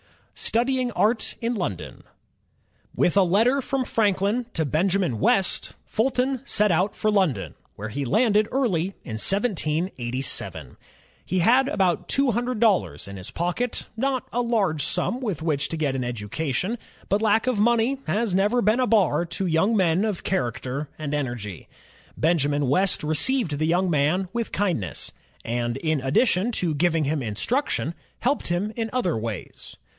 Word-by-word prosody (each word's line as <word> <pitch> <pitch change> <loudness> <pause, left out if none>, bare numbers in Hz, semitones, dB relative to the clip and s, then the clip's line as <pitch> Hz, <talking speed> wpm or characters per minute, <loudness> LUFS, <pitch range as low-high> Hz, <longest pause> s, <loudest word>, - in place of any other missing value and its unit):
Studying 250 +1 0
Art 220 +2 +1
in 235 +1 0
London 175 - -4 0.9
With 175 - +2
a 200 - +6
letter 225 +9 +3
from 265 0 -1
Franklin 210 +2 +1
to 160 - 0
Benjamin 170 - +1
West, 190 - +1
Fulton 255 +2 0
set 210 -6 +2
out 180 +5 +1
for 215 - +1
London, 140 - +1 0.2
where 110 +2 -6
he 140 +6 -3
landed 210 - +3
early 195 -9 0
in 110 -2 -5
1787. 155 - -2 0.5
He 185 - -2
had 250 +9 +4
about 185 - 0
two 275 -2 +2
himdred 245 +2 -1
dollars 190 - +2
in 100 0 -8
his 90 - -6
pocket, 180 +8 -2
not 260 +2 -1
a 245 - +1
large 205 -11 +1
simi 250 - -1
with 205 - -3
which 145 -4 0
to 165 - -3
get 145 -4 0
an 130 - -1
education; 130 - -2 0.3
but 200 +2 +1
lack 220 +1 +3
of 255 -5 0
money 235 +4 +2
has 210 +4 0
never 210 +6 +2
been 215 +5 +3
a 255 - +2
bar 175 -9 +3
to 175 +3 -3
young 185 +6 +2
men 180 0 +3
of 210 -5 -2
character 135 -2 -2
and 150 -2 -4
energy. 120 - -4 0.5
Benjamin 145 -3 +2
West 185 +8 +2
received 155 - +1
the 155 - +1
young 180 +2 +2
man 160 +6 +1
with 235 -1 -2
kindness, 175 - -2 0.3
and 120 +1 -1
in 155 -1 0
addition 185 - +2
to 175 -6 0
giving 165 +1 +2
him 145 +1 0
instruction, 160 - -1 0.3
helped 275 +3 0
him 185 +5 -1
in 225 -1 -2
other 215 -10 0
ways. 110 -4 -6
185 Hz, 155 wpm, -24 LUFS, 150-230 Hz, 0.9 s, a